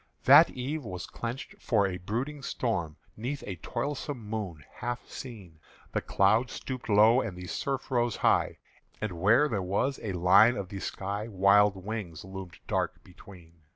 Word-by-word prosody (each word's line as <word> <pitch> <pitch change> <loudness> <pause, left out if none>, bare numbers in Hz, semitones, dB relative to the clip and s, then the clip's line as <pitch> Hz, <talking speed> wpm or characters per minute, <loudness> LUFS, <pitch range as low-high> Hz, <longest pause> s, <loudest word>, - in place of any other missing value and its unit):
That - - +8
eve 140 +4 -4
was 90 -5 -6
clenched 120 +4 -6
for 105 -4 +2
a 95 -2 -2
boding 125 +10 -3
storm, 95 - -2 0.2
'Neath 135 +6 -4
a 95 -3 -5
toilsome 130 - -4
moon, 100 -8 -4
half 120 0 -4
seen; 100 -11 -9 0.3
The - - -1
cloud 110 +6 +2
stooped 130 -3 -6
low 110 +5 +6
and 95 -8 -5
the 90 - -7
surf 135 +9 -3
rose 120 -2 +1
high; - - +2 0.4
And 110 -2 -2
where 105 - +4
there 105 -8 -1
was 100 +9 -1
a 105 -4 -3
line 95 +7 +5
of 95 - -5
the 100 -2 -6
sky, 100 +3 -4
Wild 100 0 +4
wings 95 -5 -6
loomed 95 -3 -8
dark - - -1
between. 90 -3 -16
105 Hz, 160 wpm, -29 LUFS, 95-120 Hz, 0.4 s, That